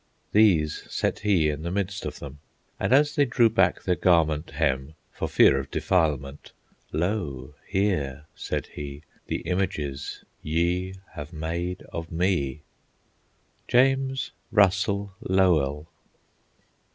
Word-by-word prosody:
These 90 -8 +3
set - - -1
he 95 -7 +2
in 75 0 -2
the 85 - -3
midst 100 +1 -2
of - - -6
them, 70 0 -9 0.4
And - - -1
as 145 +3 +5
they 145 - +3
drew 120 -3 +3
back 115 - +2
their 90 - +2
garment 80 -3 +2
hem 65 +3 -1 0.2
For - - -3
fear 70 - +5
of 70 0 -6
defilement, 75 -6 -1 0.4
"Lo, 75 -6 -2
here," 80 -8 -1
said - - -3
he, 70 +1 -7 0.2
"The - - -2
images 75 -6 -3 0.2
ye 90 +4 0 0.2
have 75 +1 -8
made 85 +3 -4
of 80 0 -5
me." 85 -5 0 1.1
JAMES 135 +1 +2 0.2
RUSSELL 100 0 +2
LOWELL. 80 -6 +2
85 Hz, 120 wpm, -26 LUFS, 75-100 Hz, 1.1 s, as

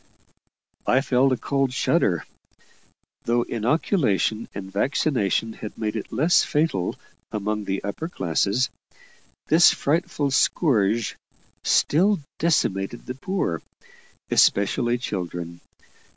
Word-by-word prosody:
I 130 - +4
felt 135 -1 +2
a 130 - +1
cold 135 0 0
shudder. 105 - +1 1.0
Though 120 +1 +2
inoculation 115 - 0
and 95 -1 -7
vaccination 115 - 0
had 105 - -8
made 110 -1 -2
it 110 - -5
less 155 +9 +3
fatal 150 - 0 0.4
among 105 0 -2
the 95 0 -2
upper 130 +11 -4
classes, 100 - 0 0.7
this 165 +3 +6
frightful 150 -2 -1
scourge 115 - +2 0.5
still 195 +6 +3 0.2
decimated 120 - 0
the 125 - -4
poor, 135 - -2 0.7
especially 120 +4 +3
children. 85 -6 -5
120 Hz, 100 wpm, -24 LUFS, 100-145 Hz, 1.0 s, this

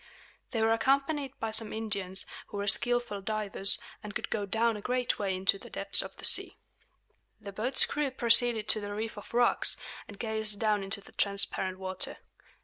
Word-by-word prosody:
They 225 -3 -1
were 225 0 +3
accompanied 275 +3 -1
by 225 -1 -3
some 220 0 -3
Indians, 200 -4 +1 0.2
who - - -8
were 200 - -3
skilful 240 -1 +2
divers, 205 -1 +2 0.2
and 210 -2 -9
could - - -5
go 205 -2 -2
down 225 +3 0
a 210 - -7
great 250 +2 -2
way 195 -2 -1
into 190 +1 +1
the - - -13
depths - - +1
of - - -9
the - - -2
sea. - - +6 0.8
The 205 -2 -9
boat's 235 +7 +4
crew 295 -1 -2
proceeded 235 -3 +3
to 215 - +4
the 205 0 -6
reef 220 +1 -5
of 205 - -12
rocks, 240 0 +1 0.3
and 205 - -12
gazed 220 -2 -1
down 215 -2 +1
into 195 +1 -3
the - - -17
transparent 195 -2 -1
water. 185 0 -4
215 Hz, 185 wpm, -29 LUFS, 200-235 Hz, 0.8 s, sea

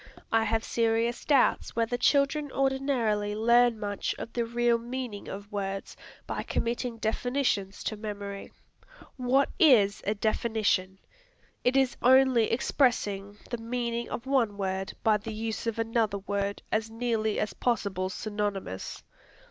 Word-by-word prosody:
I 225 0 +3
have 225 +1 0
serious 230 +1 0
doubts 280 -4 +2
whether 230 +1 +1
children 280 +3 +2
ordinarily 260 -7 0
learn 235 +1 +4
much 205 -1 -2
of 230 - -7
the 235 -1 0
real 235 0 +2
meaning 240 -3 -5
of 200 +2 -8
words 195 -1 -4 0.3
by - - -3
committing 235 0 -2
definitions 225 -3 -1
to 215 - -2
memory. 205 -2 -6 0.6
What 260 +2 +2
is 230 - +5
a 210 - +1
definition? 215 -3 0 0.7
It 250 +2 +3
is 265 -2 +2
only 260 -2 +5
expressing 210 -5 +1
the 240 - -2
meaning 235 0 -3
of 235 - -5
one 245 -7 +1
word 190 -1 -2
by 215 -1 +4
the 220 +2 -7
use 220 +1 -4
of 230 - -1
another 225 -2 0
word 200 0 -3
as 220 +1 0
nearly 225 -2 -1
as 215 - -1
possible 200 -6 -1
synonymous. 205 - -4
225 Hz, 135 wpm, -28 LUFS, 205-245 Hz, 0.7 s, is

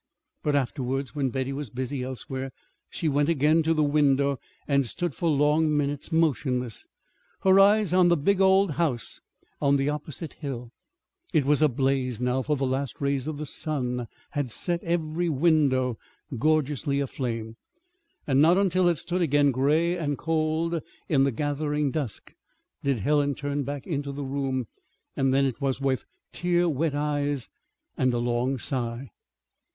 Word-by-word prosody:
But 150 -1 0
afterwards, 135 0 -1
when 140 -3 0
Betty 130 +1 -2
was 140 -2 -5
busy 130 +4 -3
elsewhere, 130 +1 -5 0.4
she 165 - -3
went 145 +1 +2
again 155 +1 +3
to 160 +1 +1
the 155 -2 +3
window 140 -2 +2 0.3
and 140 -1 +3
stood 145 - -3
for 170 - -1
long 150 +1 +3
minutes 145 +2 -2
motionless, 130 -7 0 0.5
her 190 0 +5
eyes 205 -2 +5
on 180 -1 +5
the 170 -1 +4
big 195 +7 +2
old 190 -1 +5
house 145 -6 -2 0.4
on 140 -1 +4
the 135 +1 +1
opposite 150 +1 -5
hill. 125 -6 -6 0.6
It 150 -4 +4
was 145 +1 +3
ablaze, 130 -4 +1
now, 125 +1 0
for 150 +3 0
the 135 -1 -1
last 135 +1 -2
rays 140 -1 -1
of 155 -2 -3
the 150 - -4
sun 125 -5 -3 0.2
had 145 -3 -2
set 175 +9 -3
every 170 0 -1
window 135 -5 +2 0.4
gorgeously 145 +1 +1
aflame. 115 -5 -3 0.7
And 135 -1 +3
not 170 +4 +5
until 185 -2 +3
it 170 - +1
stood 180 +5 -2
again 145 -3 +3
gray 155 +7 +2
and 145 -5 -2
cold 160 +1 0 0.3
in 135 -3 +4
the 140 - +1
gathering 145 +2 -1
dusk 140 -8 -4 0.5
did 140 -2 +1
Helen 145 +3 +2
turn 145 +1 -2
back 140 0 -5
into 145 -4 -3
the 140 +1 -5
room; 135 -2 -2 0.5
and 135 -1 +2
then 135 +1 +3
it 130 0 -3
was 135 -1 0
with 135 -2 0 0.3
tear 175 0 +1
wet 155 -1 0
eyes 145 -3 -1 0.5
and 130 -1 +2
a - - +1
long 120 +2 0
sigh. 120 -1 -3
145 Hz, 160 wpm, -26 LUFS, 130-155 Hz, 0.7 s, her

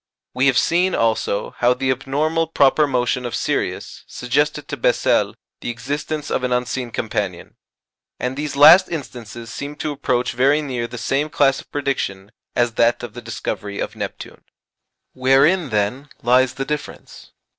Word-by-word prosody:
We 130 +2 +2
have 130 - +3
seen, 180 +2 +2
also, 110 -3 0
how 120 +1 +4
the 130 0 0
abnormal 150 +5 0
proper 150 -1 +3
motion 125 -1 0
of 120 - -3
Sirius - - -2
suggested 145 +4 -1
to - - -2
Bessel - - +2 0.2
the - - -5
existence 145 +5 -4
of 130 - 0
an 125 - -1
unseen 125 0 -1
companion. 105 -5 -4 0.6
And 125 +1 -2
these 145 0 -4
last 170 +6 +8
instances 120 -7 -7
seem 145 +1 -6
to 150 +1 -3
approach 130 -3 -1
very 140 +5 +2
near 125 -4 -3
the 120 - -8
same 135 +6 -1
class 135 -2 +2
of - - -23
prediction 105 -9 -3 0.2
as 120 -1 +1
that 120 +1 +3
of 120 -3 -7
the 120 - -8
discovery 105 -3 -5
of - - -4
Neptune. - - -7 0.7
Wherein, 135 +6 +3
then, 110 +7 -1
lies 125 +1 +3
the 135 0 -3
difference? 150 +1 -6
130 Hz, 155 wpm, -20 LUFS, 120-145 Hz, 0.7 s, last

